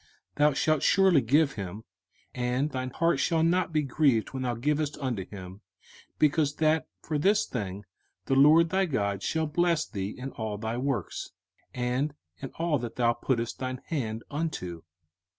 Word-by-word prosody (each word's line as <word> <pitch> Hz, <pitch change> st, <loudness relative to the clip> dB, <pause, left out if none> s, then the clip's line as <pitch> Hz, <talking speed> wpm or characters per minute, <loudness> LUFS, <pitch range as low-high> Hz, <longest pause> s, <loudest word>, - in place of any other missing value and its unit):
05:015:010 -, -, -31 dB, 0.3 s
Thou 150 Hz, 0 st, +4 dB
shalt 155 Hz, +1 st, +1 dB
surely 190 Hz, -6 st, +5 dB
give 140 Hz, +5 st, +3 dB
him, 100 Hz, -1 st, -6 dB, 0.5 s
and 125 Hz, +4 st, -1 dB
thine 130 Hz, 0 st, -3 dB
heart 170 Hz, +5 st, +1 dB
shall 165 Hz, -2 st, +2 dB
not 175 Hz, +1 st, +2 dB
be 155 Hz, -1 st, +1 dB
grieved 135 Hz, -4 st, +1 dB
when 130 Hz, -, -3 dB
thou 125 Hz, -2 st, -1 dB
givest 150 Hz, +4 st, -1 dB
unto 125 Hz, -8 st, -2 dB
him: 95 Hz, 0 st, -9 dB, 0.6 s
because 150 Hz, -1 st, +2 dB
that 160 Hz, 0 st, +2 dB, 0.2 s
for 150 Hz, -1 st, -1 dB
this 205 Hz, +6 st, +3 dB
thing 100 Hz, -4 st, -5 dB, 0.4 s
the -, -, 0 dB
LORD 155 Hz, +5 st, +6 dB
thy 190 Hz, +1 st, +2 dB
God 100 Hz, -, -1 dB
shall 160 Hz, +9 st, 0 dB
bless 165 Hz, +1 st, +1 dB
thee 100 Hz, -3 st, -4 dB
in 130 Hz, +1 st, -6 dB
all 110 Hz, -2 st, -4 dB
thy 110 Hz, +2 st, -3 dB
works, 125 Hz, -6 st, -2 dB, 0.4 s
and 125 Hz, +4 st, -1 dB, 0.2 s
in 135 Hz, -, -6 dB
all 165 Hz, -3 st, +1 dB
that 120 Hz, -1 st, -6 dB
thou 120 Hz, -1 st, +3 dB
puttest 120 Hz, -1 st, -2 dB
thine 130 Hz, -1 st, -3 dB
hand 115 Hz, -8 st, -2 dB
unto. 140 Hz, -, -3 dB
135 Hz, 170 wpm, -28 LUFS, 115-155 Hz, 0.6 s, LORD